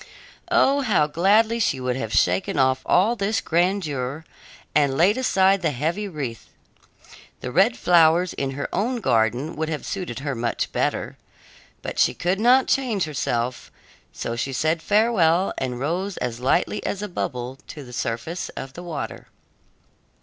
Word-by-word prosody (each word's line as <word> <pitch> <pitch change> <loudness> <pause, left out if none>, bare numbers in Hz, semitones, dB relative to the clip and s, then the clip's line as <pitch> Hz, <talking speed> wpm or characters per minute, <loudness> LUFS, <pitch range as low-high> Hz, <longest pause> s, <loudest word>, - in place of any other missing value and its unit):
Oh, 280 +1 +3
how 210 - +2
gladly 210 +9 +3
she 140 - +1
would 125 -1 -1
have 115 -5 -4
shaken 90 +2 +1
off 130 -1 +2
all 210 +6 +3
this 205 0 0
grandeur 160 -5 -1 0.5
and 140 -3 +2
laid 190 +6 +4
aside 195 -6 +3
the 165 - +1
heavy 160 +10 -2
wreath! 140 - -6 0.9
The 125 - -5
red 195 - +3
flowers 170 0 +4
in 135 - -2
her 145 - -2
own 230 +7 0
garden 120 - +1
would 160 +1 -2
have 155 -2 -4
suited 180 -10 -5
her 140 0 -2
much 115 -1 -2
better. - - -2 0.7
But - - -5
she - - +3
could 180 +3 -1
not 250 +4 +5
change 235 -8 +1
herself, 125 -5 -2 0.4
so 115 - -4
she 135 +3 -3
said 160 +5 0
farewell 195 -5 +2
and 125 -2 -3
rose 180 +8 -2
as 120 -1 -3
lightly 155 +10 0
as 200 +1 -3
a - - -3
bubble 130 -7 -4
to 150 - -9
the 125 -1 -12
surface 120 +10 -3
of 135 0 -6
the 175 - -9
water. 140 - -6
160 Hz, 155 wpm, -23 LUFS, 130-195 Hz, 0.9 s, not